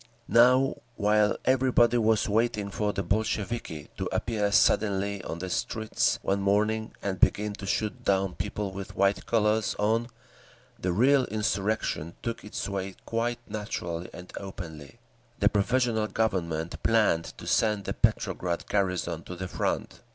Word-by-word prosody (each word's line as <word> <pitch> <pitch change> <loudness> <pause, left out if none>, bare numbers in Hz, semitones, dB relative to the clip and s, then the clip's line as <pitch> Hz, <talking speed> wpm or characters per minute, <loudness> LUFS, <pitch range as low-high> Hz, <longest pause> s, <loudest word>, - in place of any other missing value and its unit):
Now 125 +3 +5 0.2
while 105 0 +3
everybody 125 -2 +4
was 110 -1 +2
waiting 105 -1 0
for 105 +1 0
the 100 0 -2
Bolsheviki 105 -4 -2
to - - -2
appear 105 -3 0
suddenly 100 -2 +2
on 80 - -5
the 95 +2 -5
streets 110 +5 0
one 100 +1 0
morning 105 +2 +1
and 95 -2 -2
begin 105 0 +3
to 100 -1 -8
shoot 105 0 -1
down 95 -1 +1
people 105 0 -3
with 95 0 -7
white 100 +1 +1
collars 110 -1 +2
on, 110 +3 +1 0.7
the 90 - -1
real 130 +7 +4
insurrection 105 -5 -1
took 115 -1 -3
its 105 - -4
way 95 -1 -4
quite 120 +1 -1
naturally 90 -5 -4
and 90 0 -11
openly. 85 -4 -8 0.4
The 100 - +4
Provisional 110 +1 +1
Government 85 -7 -1
planned 110 -7 +2
to - - -10
send 105 -2 +2
the - - -2
Petrograd 85 -1 0
garrison 95 -3 0
to 90 - -7
the 90 +1 -5
front. - - -2
105 Hz, 145 wpm, -28 LUFS, 95-110 Hz, 0.7 s, Now